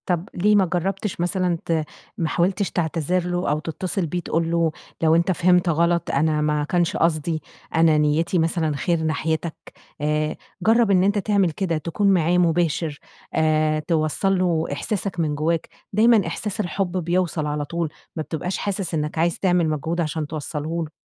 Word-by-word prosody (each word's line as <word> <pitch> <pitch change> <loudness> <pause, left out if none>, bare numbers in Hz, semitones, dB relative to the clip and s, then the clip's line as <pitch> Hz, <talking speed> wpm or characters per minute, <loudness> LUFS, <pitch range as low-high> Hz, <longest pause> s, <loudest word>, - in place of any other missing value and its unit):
طب 175 0 -1
ليه 210 +4 +3
ما 195 -2 +5
جربتش 190 +2 -2
مثلًا 180 -1 0
ت - - -2 0.5
ما 165 - 0
حاولتش 185 +4 0
تعتذر 170 +1 0
له، 175 +1 -1
أو 150 +1 +1
تتصل 175 +3 -3
بيه 175 +3 -2
تقول 165 -1 -1
له 170 -1 +2 0.3
لو 160 0 +4
أنتَ 170 +2 +2
فهمت 180 0 +3
غلط، 170 +1 +1
أنا 150 +1 +1
ما 150 0 +1
كانش 175 +2 0
قصدي، 160 -1 0 0.3
أنا 160 -1 +5
نيتي 155 +4 +2
مثلًا 160 -2 0
خير 170 +2 0
ناحيتك؟ 160 +1 -1 0.5
آآ، 150 +1 0 0.3
جرّب 225 -1 +4
إن 185 -1 +4
أنتَ 200 +2 +2
تعمل 200 -3 +2
كده 170 0 -1
تكون 170 +6 -1
معاه 175 0 +2
مباشر، 165 -3 +1 0.3
آآ، 155 -1 +2
توصّل 160 +5 0
له 170 -3 +1
إحساسك 195 +4 -3
من 155 -3 0
جوّاك، 160 +2 -1 0.2
دايمًا 220 0 +4
إحساس 210 0 -4
الحب 185 -2 -1
بيوصل 170 -2 0
على 150 0 -2
طول، 170 +1 -2 0.3
ما 155 - -2
بتبقاش 170 +4 -3
حاسس 195 -3 -3
إنك 150 0 -2
عايز 170 +1 +1
تعمل 180 -4 +2
مجهود 160 +3 -1
عشان 155 -1 -2
توصله 155 +2 -3
له. 155 - -8
170 Hz, 170 wpm, -23 LUFS, 155-180 Hz, 0.5 s, ما